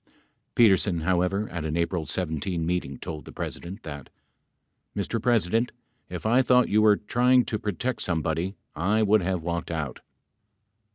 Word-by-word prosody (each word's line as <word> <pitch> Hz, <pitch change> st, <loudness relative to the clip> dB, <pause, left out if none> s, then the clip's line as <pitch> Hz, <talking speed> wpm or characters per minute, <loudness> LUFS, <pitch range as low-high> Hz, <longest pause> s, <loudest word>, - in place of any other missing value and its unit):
39 -, -, -33 dB, 0.3 s
Petersen, 95 Hz, -5 st, +4 dB
however, 95 Hz, +4 st, +1 dB
at 90 Hz, -3 st, -4 dB
an 80 Hz, +1 st, -2 dB
April 85 Hz, -1 st, -1 dB
IT 80 Hz, -2 st, -3 dB
meeting 80 Hz, -5 st, -2 dB
told 80 Hz, +2 st, -6 dB
the -, -, -11 dB
President 95 Hz, +5 st, -6 dB
that: 70 Hz, -4 st, -8 dB, 0.9 s
Mr. 105 Hz, +3 st, -1 dB
President, 115 Hz, 0 st, +2 dB, 0.4 s
if -, -, -6 dB
I 120 Hz, +4 st, +4 dB
thought 125 Hz, 0 st, +4 dB
you 105 Hz, +1 st, +4 dB
were 105 Hz, -1 st, +6 dB
trying 125 Hz, +3 st, +3 dB
to 110 Hz, -, -2 dB
protect 110 Hz, +4 st, -2 dB
somebody, 85 Hz, +2 st, -1 dB, 0.2 s
I 100 Hz, +8 st, +2 dB
would 105 Hz, 0 st, +4 dB
have 90 Hz, -2 st, -1 dB
walked 85 Hz, 0 st, -3 dB
out. 80 Hz, -5 st, -3 dB
95 Hz, 155 wpm, -26 LUFS, 85-110 Hz, 0.9 s, were